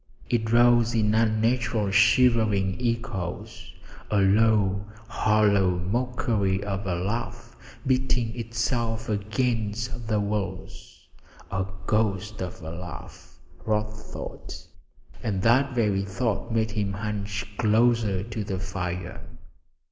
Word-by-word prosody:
It 110 Hz, -2 st, +1 dB
rose 120 Hz, 0 st, +5 dB
in 105 Hz, -1 st, +2 dB
unnatural 110 Hz, -1 st, +1 dB
shivering 105 Hz, -2 st, +4 dB
echoes 110 Hz, -7 st, -3 dB, 0.4 s
a 105 Hz, -, +1 dB
low, 100 Hz, -1 st, +3 dB, 0.2 s
hollow 105 Hz, -4 st, +3 dB
mockery 100 Hz, -1 st, 0 dB
of 100 Hz, -1 st, -3 dB
a 90 Hz, -, 0 dB
laugh 105 Hz, +7 st, -4 dB, 0.3 s
beating 130 Hz, -3 st, +1 dB
itself 115 Hz, -1 st, -2 dB
against 115 Hz, +2 st, -1 dB
the 110 Hz, -1 st, +1 dB
walls; 95 Hz, -2 st, -5 dB, 0.4 s
a 95 Hz, -1 st, -1 dB, 0.2 s
ghost 105 Hz, -1 st, 0 dB
of 90 Hz, -3 st, -6 dB
a 80 Hz, -, -5 dB
laugh, 85 Hz, -1 st, -9 dB, 0.3 s
Rod 105 Hz, -1 st, 0 dB
thought, 105 Hz, 0 st, -9 dB, 0.6 s
and 95 Hz, -3 st, -2 dB
that 130 Hz, +3 st, +3 dB
very 105 Hz, -5 st, +2 dB
thought 110 Hz, +3 st, -2 dB
made 110 Hz, -1 st, +1 dB
him 100 Hz, -2 st, -1 dB
hunch 105 Hz, 0 st, -3 dB
closer 110 Hz, -3 st, +3 dB
to 110 Hz, 0 st, -4 dB
the 95 Hz, -2 st, -3 dB
fire. 90 Hz, -2 st, -4 dB
105 Hz, 110 wpm, -26 LUFS, 95-115 Hz, 0.6 s, rose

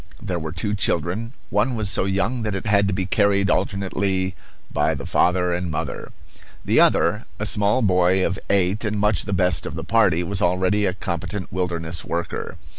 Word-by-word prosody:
There 90 Hz, -2 st, -3 dB
were 80 Hz, -1 st, -5 dB
two 105 Hz, +5 st, -1 dB
children. 100 Hz, -, -1 dB, 0.2 s
One 110 Hz, +5 st, +1 dB
was 110 Hz, -2 st, -2 dB
so 95 Hz, -, 0 dB
young 100 Hz, +6 st, 0 dB
that 105 Hz, -2 st, -2 dB
it 95 Hz, -, -5 dB
had 100 Hz, -2 st, +3 dB
to -, -, 0 dB
be 95 Hz, 0 st, -1 dB
carried 100 Hz, 0 st, +2 dB
alternately 95 Hz, -1 st, -1 dB, 0.4 s
by -, -, +1 dB
the -, -, -7 dB
father 90 Hz, 0 st, +2 dB
and 90 Hz, 0 st, -2 dB
mother. 75 Hz, -, -4 dB, 0.5 s
The -, -, +3 dB
other, -, -, +3 dB
a -, -, -3 dB
small 105 Hz, +4 st, +3 dB
boy 90 Hz, -1 st, +3 dB
of 95 Hz, -, -2 dB
eight, 100 Hz, +2 st, +2 dB
and 105 Hz, -1 st, -1 dB
much 105 Hz, -2 st, +1 dB
the -, -, -4 dB
best 90 Hz, -3 st, +1 dB
of -, -, -6 dB
the -, -, -4 dB
party, 100 Hz, -7 st, +3 dB
was 95 Hz, +2 st, -2 dB
already 95 Hz, +3 st, +2 dB
a 90 Hz, -, -1 dB
competent 95 Hz, +1 st, -4 dB
wilderness 85 Hz, -3 st, -2 dB
worker. 85 Hz, -1 st, -4 dB
95 Hz, 190 wpm, -22 LUFS, 90-105 Hz, 0.5 s, had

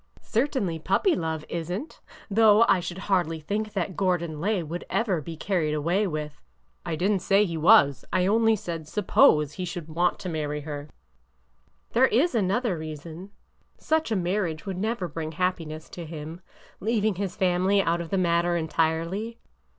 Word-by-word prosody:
Certainly 220 Hz, -, -1 dB
puppy 195 Hz, -, +2 dB
love 160 Hz, -, -3 dB
is 170 Hz, 0 st, -4 dB
n't! 220 Hz, -, -6 dB, 0.3 s
Though 220 Hz, +1 st, +5 dB
I 195 Hz, -, +4 dB
should 175 Hz, 0 st, -5 dB
hardly 180 Hz, -5 st, 0 dB
think 210 Hz, +6 st, -3 dB
that 185 Hz, -2 st, -2 dB
Gordon 170 Hz, -5 st, -1 dB
Lay 200 Hz, -1 st, 0 dB
would 165 Hz, +3 st, -5 dB
ever 195 Hz, -8 st, 0 dB
be 165 Hz, +2 st, -8 dB
carried 165 Hz, -4 st, 0 dB
away 175 Hz, +7 st, +1 dB
with—" 150 Hz, -2 st, -5 dB, 0.4 s
I 170 Hz, -2 st, -3 dB
did 185 Hz, +6 st, +1 dB
n't 195 Hz, -3 st, +1 dB
say 200 Hz, +1 st, +3 dB
he 170 Hz, -4 st, -4 dB
was. 155 Hz, -, +5 dB
I 180 Hz, 0 st, +2 dB
only 225 Hz, +2 st, +4 dB
said 170 Hz, -7 st, -6 dB
suppose 150 Hz, -6 st, +3 dB
he 185 Hz, -, -5 dB
should 175 Hz, -2 st, -5 dB
v/ant 170 Hz, +3 st, 0 dB
to 190 Hz, -, -5 dB
marry 150 Hz, -2 st, -3 dB
her." 145 Hz, 0 st, -6 dB, 0.5 s
'' -, -, -41 dB
There 255 Hz, +3 st, +5 dB
is 280 Hz, +11 st, +2 dB
another 205 Hz, -2 st, 0 dB
reason. 160 Hz, +4 st, -8 dB, 0.5 s
Such 315 Hz, -4 st, 0 dB
a -, -, +2 dB
marriage 175 Hz, -3 st, -1 dB
would 190 Hz, -2 st, -4 dB
never 215 Hz, -2 st, -1 dB
bring 160 Hz, 0 st, -5 dB
happiness 160 Hz, -3 st, -2 dB
to 175 Hz, -, -7 dB
him, 160 Hz, +2 st, -8 dB, 0.2 s
— -, -, -26 dB
leaving 220 Hz, 0 st, +1 dB
his 190 Hz, 0 st, -4 dB
family 185 Hz, +2 st, +2 dB
out 170 Hz, -2 st, +1 dB
of 165 Hz, -, -7 dB
the 195 Hz, -, 0 dB
matter 175 Hz, -1 st, +2 dB
entirely. 165 Hz, +7 st, -1 dB
175 Hz, 175 wpm, -26 LUFS, 160-205 Hz, 0.5 s, Though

